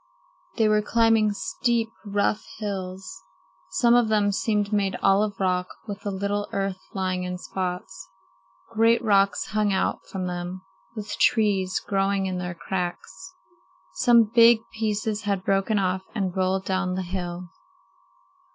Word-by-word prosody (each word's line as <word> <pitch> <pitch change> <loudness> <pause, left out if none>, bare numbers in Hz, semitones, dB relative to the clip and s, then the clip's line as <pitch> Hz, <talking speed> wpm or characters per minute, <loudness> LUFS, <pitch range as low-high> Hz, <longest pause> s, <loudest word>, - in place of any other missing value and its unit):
They 220 -2 +4
were 215 0 +3
climbing 225 -1 +3
steep, 235 +2 -1 0.2
rough 205 0 0
hills. 190 -3 -5 0.5
Some 235 -2 +3
of 240 -2 +4
them 210 -2 +2
seemed 210 0 0
made 200 -2 +1
all 195 +1 +5
of 205 -2 -2
rock, 180 -1 +1 0.2
with 200 -1 -6
a - - +1
little 200 +1 -2
earth 195 -1 -2 0.2
lying 185 -1 -1
in 180 0 -4
spots. 180 - -5 0.6
Great 230 +1 +4
rocks 200 -2 +3
hung 210 -1 +1
out 190 - 0
from 190 -2 -4
them, 180 +1 -5 0.3
with 215 -2 -6
trees 200 -5 +2
growing 195 0 0
in 185 -1 -2
their 180 -1 -4
cracks. 180 0 -5 0.6
Some 235 -2 +5
big 230 +1 +5
pieces 215 -1 -1
had 200 -3 -1
broken 195 +2 +1
off 185 -1 0
and 190 -4 -2
rolled 190 0 0
down 185 -1 -1
the 190 - -2
hill. 175 -1 -5
195 Hz, 140 wpm, -25 LUFS, 185-215 Hz, 0.6 s, all